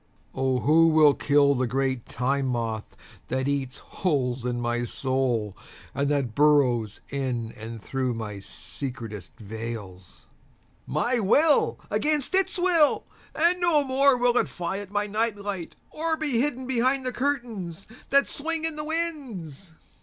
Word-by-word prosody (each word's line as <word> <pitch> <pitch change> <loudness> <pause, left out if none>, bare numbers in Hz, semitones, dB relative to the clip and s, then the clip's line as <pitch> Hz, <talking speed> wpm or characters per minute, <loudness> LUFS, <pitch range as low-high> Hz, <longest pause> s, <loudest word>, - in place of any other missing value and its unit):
(O 130 -1 0
who 165 +2 +5
will 155 -2 +6
kill 140 0 +3
the 130 -2 0
great 130 0 -1
Time 135 +2 -1
Moth 115 -3 -3 0.3
that 130 +1 -1
eats 140 -2 -2
holes 130 -8 -2
in 120 -1 -2
my 120 0 -1
soul 120 -5 -1 0.4
and 140 0 0
that 140 -6 0
burrows 125 -7 +3
in 125 -5 -2
and 115 +1 -8
through 130 -2 -2
my 105 -3 -5
secretest 115 - -7
veils!)My 110 - -6
will 290 +9 +3
against 300 0 +1
its 385 0 +2
will, 350 -4 +3 0.3
and 345 +3 +3
no 330 -4 +4
more 270 0 +3
will 245 0 +3
it - - 0
fly 180 +2 -3
at 205 -2 -8
my 205 +1 0
night 215 +1 0
light 200 -4 -5 0.2
or 320 +1 0
be 290 -7 0
hidden 260 -2 -1
behind 260 +1 +1
the 255 - -2
curtains 230 - -3 0.2
that 280 0 +4
swing 325 +2 -2
in 320 -2 -3
the 300 - -3
winds. 265 - -4
150 Hz, 145 wpm, -26 LUFS, -, 0.4 s, will